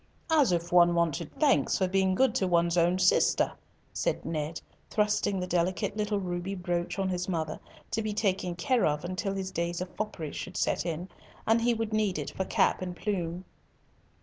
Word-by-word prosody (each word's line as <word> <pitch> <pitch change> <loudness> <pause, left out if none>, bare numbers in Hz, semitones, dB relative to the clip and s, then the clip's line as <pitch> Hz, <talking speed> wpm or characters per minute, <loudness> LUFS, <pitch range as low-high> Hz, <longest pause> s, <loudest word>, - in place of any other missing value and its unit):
"As 295 -9 +5
if 170 0 -1
one 175 -1 +6
wanted 170 -3 0
thanks 295 -3 +3
for 190 - +1
being 190 0 +2
good 265 +5 +3
to 190 - +1
one's 170 -1 +2
own 175 +1 +3
sister," 185 - +3 0.4
said - - -1
Ned, 155 0 -3 0.3
thrusting 210 -2 +1
the 180 - -2
delicate 180 +2 0
little 210 -1 0
ruby 180 +1 -3
brooch 175 -1 -2
on 195 -1 0
his 180 0 -2
mother 160 -3 -2 0.3
to 225 - 0
be 215 -1 -2
taken 190 -4 0
care 240 +8 +2
of 150 +2 -1
till 195 -1 -1
his 190 -1 -3
days 170 0 -2
of 180 0 -6
foppery 185 -8 -4
should 185 - -6
set - - 0
in, 170 +2 -3 0.4
and 225 +1 +3
he 235 0 +2
would 225 -1 -3
need 210 -4 +1
it - - -4
for 190 - -3
cap - - +2
and 180 -1 -4
plume. 180 -3 -3
185 Hz, 190 wpm, -29 LUFS, 175-210 Hz, 0.4 s, one